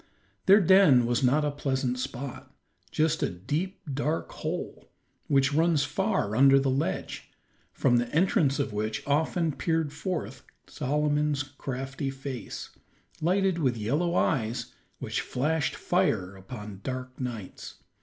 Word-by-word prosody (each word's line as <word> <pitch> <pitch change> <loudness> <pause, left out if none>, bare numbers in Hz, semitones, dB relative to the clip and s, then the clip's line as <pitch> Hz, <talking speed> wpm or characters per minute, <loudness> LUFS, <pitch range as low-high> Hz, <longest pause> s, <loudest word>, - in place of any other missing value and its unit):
Their 200 +2 +8
den 180 -10 +6
was 120 +2 +1
not 140 +4 +3
a 145 - 0
pleasant 130 -3 -1
spot; 130 +1 -6 0.4
just 160 0 +1
a - - +1
deep, 150 - -3
dark 150 +4 -1
hole, - - -5 0.4
which 135 0 +3
runs 160 -1 +3
far 150 - 0
under 135 +2 +7
the 135 -1 +1
ledge, 130 -8 -2 0.4
from 120 -2 +2
the 120 0 0
entrance 155 -4 +2
of 140 -6 -2
which 110 +1 -2
often 160 +3 +1
peered 160 0 -1
forth 155 +2 -4 0.2
Solomon's 150 +1 0
crafty 135 -1 -5
face, 135 -2 -6 0.5
lighted 185 +1 +2
with 130 -6 +1
yellow 150 +11 0
eyes 115 -7 0 0.2
which - - -2
flashed 150 +4 -1
fire 95 +1 0
upon 105 0 -9
dark 130 0 -5
nights. 120 -7 -6
140 Hz, 130 wpm, -28 LUFS, 125-155 Hz, 0.5 s, Their